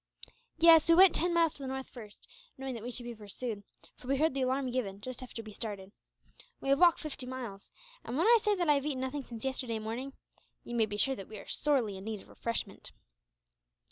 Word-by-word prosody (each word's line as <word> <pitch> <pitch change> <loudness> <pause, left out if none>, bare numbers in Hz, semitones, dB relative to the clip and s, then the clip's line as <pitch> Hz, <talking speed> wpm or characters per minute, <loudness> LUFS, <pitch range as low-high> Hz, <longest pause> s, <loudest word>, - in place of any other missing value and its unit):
"Yes; 325 -1 +7
we 335 - +8
went 370 0 +8
ten 350 +2 +1
miles 335 -2 +3
to - - -11
the 270 - -4
north 265 0 -4
first, 215 -4 -12 0.3
knowing 265 0 -4
that 230 - -6
we 240 - -5
should 245 0 -5
be 240 0 -6
pursued; 215 +1 -5 0.4
for 250 - -13
we 275 +1 +2
heard 315 +1 +2
the 270 - -1
alarm 260 0 0
given, 205 -6 -2
just 255 +4 -7
after 240 -2 -7
we 215 - -10
started. 200 -3 -5 0.7
We 270 - -4
have 275 +1 +4
walked 350 -2 +6
fifty 275 -4 -5
miles 240 -7 -7 0.3
and, 240 - -4
when 335 - +2
I 470 +1 +7
say 420 0 +2
that 350 -3 -1
I 295 - +6
have 280 -1 0
eaten 265 -4 -2
nothing 265 +2 -3
since 230 -3 -9
yesterday 255 -3 -2
morning, 230 +5 -5 0.5
you 240 - -8
may 225 -2 +3
be 205 0 -4
sure 270 +5 +2
that 195 - -9
we 215 - -9
are - - -10
sorely 250 -10 +1
in 190 - -9
need 220 -2 -4
of - - -18
refreshment." 230 -3 -4
255 Hz, 235 wpm, -32 LUFS, 220-280 Hz, 0.7 s, we